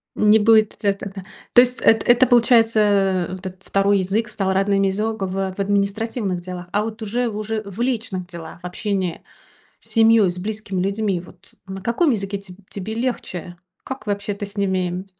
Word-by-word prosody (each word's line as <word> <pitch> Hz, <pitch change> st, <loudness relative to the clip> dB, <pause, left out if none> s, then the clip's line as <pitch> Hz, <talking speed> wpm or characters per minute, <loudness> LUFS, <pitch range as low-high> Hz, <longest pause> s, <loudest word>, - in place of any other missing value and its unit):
Не 210 Hz, +1 st, +5 dB
будет 220 Hz, 0 st, +4 dB
эт 200 Hz, -1 st, +1 dB
тогда. 195 Hz, -1 st, -7 dB, 0.3 s
То 245 Hz, -, +9 dB
есть 250 Hz, 0 st, 0 dB
это, 225 Hz, -1 st, +4 dB
это, 240 Hz, +1 st, +5 dB
получается, 230 Hz, -2 st, +4 dB
э, 195 Hz, -4 st, +2 dB
вот 185 Hz, +1 st, -8 dB
этот 185 Hz, +1 st, -11 dB
второй 200 Hz, 0 st, +2 dB
язык 200 Hz, +5 st, 0 dB
стал 195 Hz, -3 st, -1 dB
родным 195 Hz, +1 st, +2 dB
из 195 Hz, +1 st, 0 dB
огово 195 Hz, -3 st, -2 dB
в -, -, -12 dB
административных 200 Hz, 0 st, -1 dB
делах. 180 Hz, -1 st, -7 dB
А 205 Hz, +2 st, +1 dB
вот 225 Hz, +1 st, -6 dB
уже, 235 Hz, +3 st, -1 dB
уже 215 Hz, +1 st, -3 dB
в 200 Hz, +3 st, -7 dB
личных 225 Hz, -7 st, -2 dB
делах, 170 Hz, -2 st, -9 dB
общение 185 Hz, 0 st, -3 dB, 0.6 s
с -, -, -9 dB
семьей, 225 Hz, -4 st, +5 dB
с 175 Hz, -, -5 dB
близкими 200 Hz, -1 st, -4 dB
людьми, 195 Hz, -2 st, -1 dB
вот 180 Hz, +1 st, -18 dB
на 190 Hz, 0 st, -7 dB
каком 260 Hz, -, +2 dB
языке 200 Hz, -2 st, -2 dB
теб 185 Hz, -2 st, -13 dB
тебе 205 Hz, +2 st, -6 dB
легче? 205 Hz, -7 st, -4 dB, 0.3 s
Как 265 Hz, -4 st, -6 dB
вообще 200 Hz, 0 st, -2 dB
ты 205 Hz, +1 st, -5 dB
с 200 Hz, +1 st, -13 dB
ними? 185 Hz, -2 st, -1 dB
200 Hz, 180 wpm, -21 LUFS, 190-220 Hz, 0.6 s, То